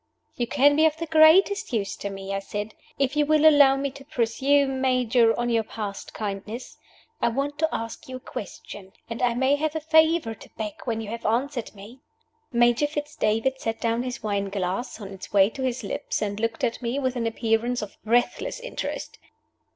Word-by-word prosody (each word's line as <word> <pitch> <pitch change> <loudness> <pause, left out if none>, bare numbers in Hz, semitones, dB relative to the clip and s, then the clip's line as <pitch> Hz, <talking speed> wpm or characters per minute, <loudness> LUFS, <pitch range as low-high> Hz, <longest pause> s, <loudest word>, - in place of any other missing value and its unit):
"You 240 -2 -1
can 285 +4 +4
be 315 +1 +5
of 310 0 -2
the 330 - -3
greatest 320 +5 +5
use 210 -5 -1
to 200 - -4
me," 195 0 -6
I 195 - -1
said, 205 +2 -5 0.2
"if 275 +1 0
you 295 - +3
will 310 +1 +4
allow 285 -3 +7
me 275 0 -2
to 275 +1 -12
presume, 270 0 +1
Major, 250 -3 +3
on 240 - 0
your 230 -1 +3
past 210 -2 -6
kindness. 210 +3 -6 0.5
I - - +3
want 280 +5 -2
to 320 0 +2
ask 230 +2 -5
you 260 - -5
a - - -6
question; 200 -4 -9 0.2
and 230 - -4
I 240 -1 +2
may 265 +3 +2
have 310 +1 -2
a - - 0
favor 315 -4 +3
to - - -15
beg 215 -2 -3
when 225 -3 -1
you 215 - -6
have 230 0 -6
answered 240 +1 -1
me." 210 +6 -12 0.5
Major 240 +3 +3
Fitz 295 0 -5
David 225 +5 0
set 225 0 -2
down 230 0 0
his 250 -1 -5
wine 200 -2 -1
glass 195 +5 -3
on 200 -3 -7
its 195 -1 -10
way 200 +1 +5
to 270 - -7
his 255 -2 -2
lips, 200 - -3
and 205 -1 -3
looked 230 0 -2
at 235 - 0
me 240 +2 -2
with 260 -2 -1
an 230 -2 -1
appearance 230 +1 0
of 210 - -9
breathless 245 - 0
interest. - - -5
240 Hz, 205 wpm, -25 LUFS, 220-280 Hz, 0.5 s, allow